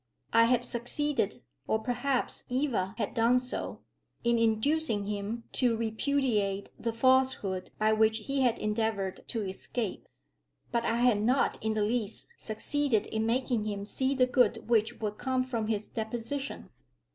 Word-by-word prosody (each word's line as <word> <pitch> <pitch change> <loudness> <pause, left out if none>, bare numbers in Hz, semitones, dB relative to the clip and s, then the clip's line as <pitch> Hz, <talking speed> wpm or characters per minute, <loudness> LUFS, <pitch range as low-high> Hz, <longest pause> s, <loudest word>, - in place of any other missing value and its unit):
I 230 0 +7
had 245 0 +2
succeeded, 280 +5 -1 0.2
or - - +2
perhaps 245 +3 -1
Eva 245 -8 0
had 215 -4 -2
done 235 +2 +4
so, 250 0 -2 0.4
in 235 0 +3
inducing 230 0 +2
him 210 +3 -3
to 240 -3 +2
repudiate 220 -3 0
the 230 - -1
falsehood 255 -6 +2
by 215 0 +3
which 220 0 +3
he 275 0 0
had 245 -3 +3
endeavoured 210 -3 -1
to 225 -3 -2
escape. 195 +2 -3 0.6
But 235 -1 0
I 230 - +1
had 240 -3 +3
not 250 +5 +2
in 220 0 0
the 215 - +1
least 220 -1 -1
succeeded 230 +2 0
in 220 0 -1
making 240 -2 0
him 200 -1 -3
see 265 +5 0
the 255 -1 +4
good 250 -5 +2
which 225 -2 +2
would 210 -1 -3
come 260 -1 0
from 235 -4 -2
his 215 -1 -1
deposition. 230 - -4
230 Hz, 150 wpm, -30 LUFS, 215-255 Hz, 0.6 s, I